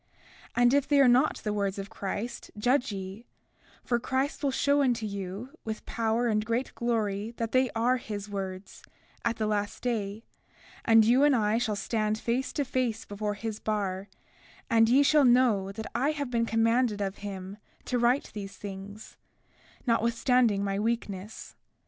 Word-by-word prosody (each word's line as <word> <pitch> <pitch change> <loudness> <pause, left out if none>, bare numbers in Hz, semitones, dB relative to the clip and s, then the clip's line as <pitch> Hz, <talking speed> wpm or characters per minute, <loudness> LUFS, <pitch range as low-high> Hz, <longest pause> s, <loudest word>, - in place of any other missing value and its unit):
33:11 - - +2
And 245 +1 +5
if 280 -1 +3
they 290 -1 +4
are 275 - +7
not 250 +5 +4
the 210 - -1
words 200 -2 -1
of 200 +1 -6
Christ, 220 +3 -5
judge 245 +2 +2
ye—for 200 +4 -6
Christ 265 +4 -1
will 285 - +1
show 280 +2 +2
unto 240 -5 +1
you, 200 +3 -5
with 220 -1 -5
power 230 +1 0
and 215 -2 +1
great 230 +4 -2
glory, 220 -2 -1
that 230 -1 -2
they 255 -1 +3
are 245 +3 +2
his 210 -4 -6
words, 195 -1 -6 0.4
at 235 0 0
the 220 - -1
last 205 -1 -2
day; 220 -3 -2 0.6
and 225 -2 +6
you 250 +5 +5
and 290 -2 +5
I 215 -1 +2
shall 220 -3 -1
stand 215 +1 -1
face 240 +4 -1
to 285 - -1
face 245 -4 -1
before 205 0 -3
his 215 0 -5
bar; 200 -2 -2 0.6
and 225 0 +5
ye 270 +4 +6
shall 295 +1 +5
know 240 -6 +4
that 220 +2 -6
I 275 +6 +1
have 285 -4 -4
been 230 -1 +1
commanded 225 -1 +2
of 195 -1 -2
him 195 -1 -7 0.3
to 250 - 0
write 245 +4 +2
these 200 -2 -7
things, 200 +1 -9 0.7
notwithstanding 230 -2 +2
my 195 0 -1
weakness. 215 -2 -4
225 Hz, 165 wpm, -28 LUFS, 205-245 Hz, 0.7 s, are